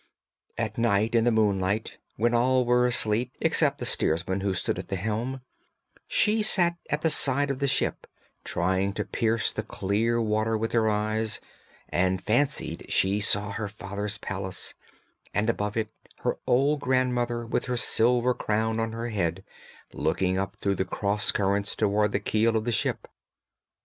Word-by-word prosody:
At 110 -1 -3
night, 110 -1 +2
in 115 -1 +3
the 120 - +4
moonlight, 105 -1 0 0.2
when 120 +3 +1
all 125 +1 +3
were 125 +1 +3
asleep, 120 +1 +2
except - - +2
the - - -5
steersman 85 +5 0
who 95 -1 -1
stood - - -2
at - - -7
the 95 - -3
helm, 115 +7 -3 0.7
she 225 - +2
sat 175 -5 +5
at 150 +1 -1
the 160 - +3
side 140 0 +3
of 135 - -4
the 140 - +1
ship - - 0 0.4
trying 95 +2 0
to 105 0 -3
pierce 110 +2 0
the - - -2
clear 110 +5 -1
water 110 0 0
with 115 +1 -2
her 110 -2 +2
eyes, 110 +1 -1 0.5
and 95 +1 +1
fancied 120 +9 -1
she 100 +2 +2
saw 105 0 +2
her 105 +1 -3
father's 100 0 -4
palace, 95 -2 -4 0.6
and 105 +3 +2
above 105 -1 -3
it 110 -1 -2 0.3
her - - -1
old 140 +4 +3
grandmother 125 -2 0
with 115 - -1
her 125 -1 -2
silver 120 +1 +2
crown 110 0 -1
on 115 0 -2
her 115 +1 -4
head, 95 -7 -2 0.5
looking 90 +5 0
up 95 +1 -2
through 100 -1 -1
the 95 - +1
cross 105 +2 0
currents 100 0 0
towards 105 0 +1
the 100 - 0
keel 110 +2 +1
of 110 - -2
the 120 - 0
ship. - - -1
110 Hz, 165 wpm, -26 LUFS, 100-120 Hz, 0.7 s, sat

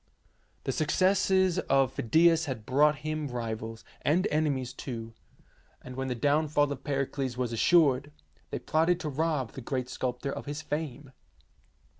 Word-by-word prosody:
The - - -1
success 185 +6 +2 0.4
of 135 -1 +3
Phidias 165 +6 +4
had 125 -7 -5
brought 150 +4 +4
him 155 -1 -2
rivals, 115 -2 -5 0.2
and 175 +6 +2
enemies 140 -5 0
too, 115 -3 -6 0.7
and 125 0 -10
when 135 0 -3
the 125 - -2
down 145 +5 +2
fall 145 -1 +2
of 135 -1 -5
Pericles 135 -2 -2
was 125 -2 -1
assured, 145 +1 +3 0.4
they - - -3
plotted 165 +3 +1
to 155 - -3
rob 150 -3 -1
the 135 - -8
great 130 0 -3
sculptor 130 +1 -3
of - - -7
his 145 +1 -4
fame. 150 -3 -4
140 Hz, 150 wpm, -29 LUFS, 125-155 Hz, 0.7 s, Phidias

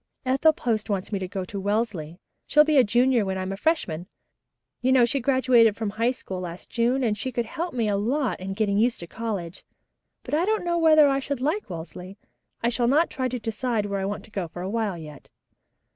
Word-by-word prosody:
"Ethel 270 +5 +4
Post 225 -7 -2
wants 195 -1 -2
me 200 - -1
to 185 - -4
go 190 0 -4
to 200 +2 -6
Wellesley. 195 -6 -2 0.3
She'll 300 +1 +6
be 305 -1 +2
a - - +7
junior 240 +2 +3
when 190 -1 -2
I'm 185 0 -3
a - - -3
freshman. 185 - -1 0.7
You 260 - +2
know, 255 -2 +6
she 275 +4 -1
was 240 - -10
graduated 255 -5 +4
from 220 -2 -3
High 230 +3 +1
School 195 -7 -5
last 175 -1 -7
June 245 +3 +1
and 220 -3 +1
she 220 +5 -4
could 240 -1 -1
help 340 +6 -5
me 230 -3 +1
a 205 - +1
lot 250 +5 0
in 195 +1 -5
getting 205 -1 +1
used 235 -2 +1
to - - -6
college. 200 -5 -5 0.6
But - - -8
I 315 +3 +3
don't 435 -2 0
know 345 0 +1
whether 310 -2 +6
I 275 -1 +2
should 280 -1 -3
like 305 - -1
Wellesley. 180 +3 -8 0.5
I 235 - +3
shall 240 0 0
not 300 +7 +3
try 260 -2 -1
to 250 0 -3
decide 225 -1 -2
where 200 -1 -2
I 190 - -2
want 205 +1 -4
to 215 - -19
go 190 -4 -3
for 175 +2 -8
a 190 - -3
while 215 -5 -1
yet." 150 -3 -11
225 Hz, 235 wpm, -25 LUFS, 195-260 Hz, 0.7 s, a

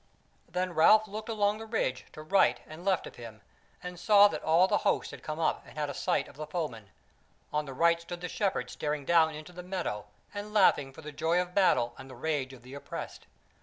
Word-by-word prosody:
Then 180 +1 -2
Ralph 215 +7 +6
looked 215 +2 -7
along 210 -1 +1
the 225 - -8
ridge 130 - -1
to 155 - -9
right 155 -8 +3
and 155 +3 -11
left 190 -2 +1
of - - -11
him, 115 -3 -10 0.4
and 180 -1 -7
saw 205 -1 +7
that - - -5
all 165 +4 +4
the - - +2
host - - 0
had - - -10
come 155 0 -5
up 160 - 0
and - - -16
had 150 -1 -1
a - - -7
sight - - 0
of - - -16
the 155 0 -6
foemen; 150 - -4 0.6
on 150 0 0
the 135 - -7
right 170 +3 +3
stood 175 +1 -8
the 180 - -3
Shepherds 195 - -2
staring 150 -2 -3
down 160 -1 +4
into 155 +3 -10
the 180 - -8
meadow 180 - -4 0.3
and 210 +1 -7
laughing 145 -9 +4
for 160 +4 -13
the 150 - -7
joy 165 +4 +1
of 180 0 -3
battle 120 -11 +3
and 135 - -10
the 130 - -10
rage 140 0 -2
of 125 -3 -14
the 130 +2 -12
oppressed. 140 - -7
165 Hz, 230 wpm, -30 LUFS, 140-185 Hz, 0.6 s, saw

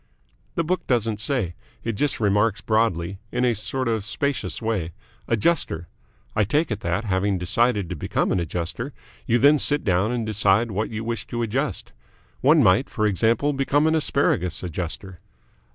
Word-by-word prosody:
"The 170 - +1
book 180 +3 -2
doesn't 115 -4 0
say. 110 - 0 0.3
It 115 - -1
just 140 +7 0
remarks 105 0 +2
broadly 100 -5 0
in 125 0 0
a 120 - +3
sort 130 +4 -2
of 110 -3 0
spacious 140 +6 -2
way 105 -8 -2 0.3
'Adjuster.' 110 - 0 0.5
I 110 - +3
take 145 - 0
it 105 - -2
that, 85 +1 -1
having 100 0 0
decided 100 +3 +1
to 90 - -5
become 75 - -1
an - - +1
adjuster, 90 - -3 0.3
you 120 - +3
then 145 +4 +5
sit 145 +1 +4
down 95 +2 +1
and 120 -2 -2
decide 105 +1 +2
what 105 +2 -2
you 110 0 -5
wish 115 -2 -4
to 120 0 -3
adjust. 130 +6 -2 0.5
One 150 +3 +5
might, 95 +6 +3
for 110 -4 -1
example, 115 +8 +2
become 140 +2 +1
an 160 - +3
Asparagus 95 - +1
Adjuster." 90 +1 -5
110 Hz, 170 wpm, -23 LUFS, 95-130 Hz, 0.5 s, then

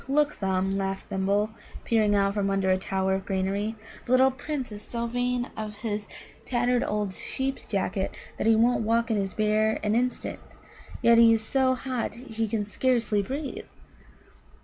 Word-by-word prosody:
"Look, 295 +2 +2
Thumb," 190 0 0
laughed 195 0 -3
Thimble, 200 +3 +1 0.3
peering 215 -3 +3
out 200 0 +2
from 200 -1 0
under 195 -1 +1
a 185 - +4
tower 190 0 0
of 190 0 -1
greenery, 200 +3 -1 0.3
"the - - -3
little 260 +1 +6
Prince 265 -2 -4
is 205 0 -7
so 235 +2 -4
vain 245 +1 -1
of 215 -1 -5
his 210 -3 -3 0.4
tattered 245 0 +1
old 210 -2 -1
sheep's 265 +6 -3
jacket 195 -1 -2 0.2
that - - 0
he 225 - +6
won't 235 +2 +3
walk 230 +1 +1
in 220 - +2
his 195 -2 -2
bare 215 0 +2
an 210 0 +1
instant, 250 +2 -1 0.6
yet 235 0 +6
he 230 -1 +8
is 225 -1 +2
so 260 0 +2
hot 255 -3 -3
he 225 -2 -3
can 210 -1 -1
scarcely 230 -1 +1
breathe." 275 +7 -5
220 Hz, 170 wpm, -27 LUFS, 200-245 Hz, 0.6 s, he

